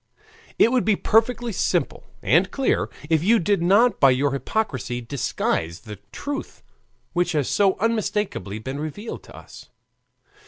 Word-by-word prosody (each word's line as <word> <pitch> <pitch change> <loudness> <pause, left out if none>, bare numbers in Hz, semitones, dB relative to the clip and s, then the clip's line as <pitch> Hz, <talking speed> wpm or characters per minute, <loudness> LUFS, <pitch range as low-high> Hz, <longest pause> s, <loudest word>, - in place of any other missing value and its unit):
It 230 - +5
would 255 -2 +2
be 215 - +3
perfectly 235 +3 +1
simple - - -1 0.2
and - - +3
clear 270 -2 0 0.2
if 160 -1 +2
you 225 +5 +5
did 200 -1 +1
not 205 +8 +4
by 135 - +6
your 135 +2 +2
hypocrisy 130 - -2
disguise 115 -9 -2
the 105 -4 -10
truth 285 - -6 0.5
which 175 0 0
has 145 -4 0
so 195 -2 +2
unmistakably 210 - -1
been 130 +6 -6
revealed 155 +9 -6
to - - -14
us. - - -13
180 Hz, 145 wpm, -23 LUFS, 135-220 Hz, 0.5 s, by